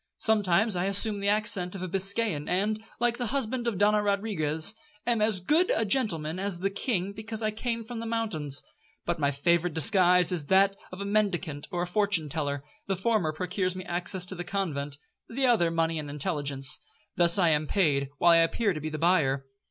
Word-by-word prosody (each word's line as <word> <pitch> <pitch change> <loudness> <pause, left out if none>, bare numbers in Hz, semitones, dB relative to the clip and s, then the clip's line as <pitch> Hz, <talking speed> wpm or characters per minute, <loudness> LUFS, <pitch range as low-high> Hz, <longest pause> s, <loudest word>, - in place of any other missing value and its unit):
Sometimes 210 -1 +2
I 175 +1 -1
assume 200 +2 +4
the 200 0 0
accent 205 -4 0
of 190 - -6
a - - -3
Biscayan, 195 -3 0
and, 210 +4 0 0.2
like 240 0 0
the 245 - -2
husband 250 -1 -2
of 225 -5 -1
Donna 210 +2 +3
Rodriguez, 200 -5 0 0.3
'am 235 -3 +1
as 215 -3 +2
good 310 - +2
a 225 - 0
gentleman 185 - +1
as 195 -2 -2
the 195 +3 -2
king, 200 -3 -2
because 220 +1 -5
I 215 - 0
came 230 +1 -4
from 235 0 -7
the 230 - -5
mountains.' 170 -12 0 0.4
But 170 -1 -2
my 140 -1 +2
favourite 170 +4 0
disguise 180 -1 +4
is 170 -5 -3
that 195 +3 +3 0.2
of 185 +2 -8
a - - -4
mendicant 190 -8 -1
or 175 -1 -2
a - - -1
fortune 180 -4 +1
teller,—the 155 - -4
former 190 -4 0
procures 185 +3 -2
me 185 -1 -7
access 180 +1 -3
to 185 - -8
the 175 -1 -6
convent, 150 -7 -3 0.3
the 265 +3 0
other 225 -9 +3
money 165 -1 -1
and 150 -1 -6
intelligence. 140 -2 0 0.4
Thus 170 +1 +5
I 175 -4 +3
am 150 -1 +1
paid, 145 -8 +1
while 175 +3 +4
I 170 - +6
appear 195 +5 +1
to 155 - -6
be 155 - -4
the 155 - -5
buyer. 145 -5 +1
185 Hz, 200 wpm, -27 LUFS, 165-215 Hz, 0.4 s, I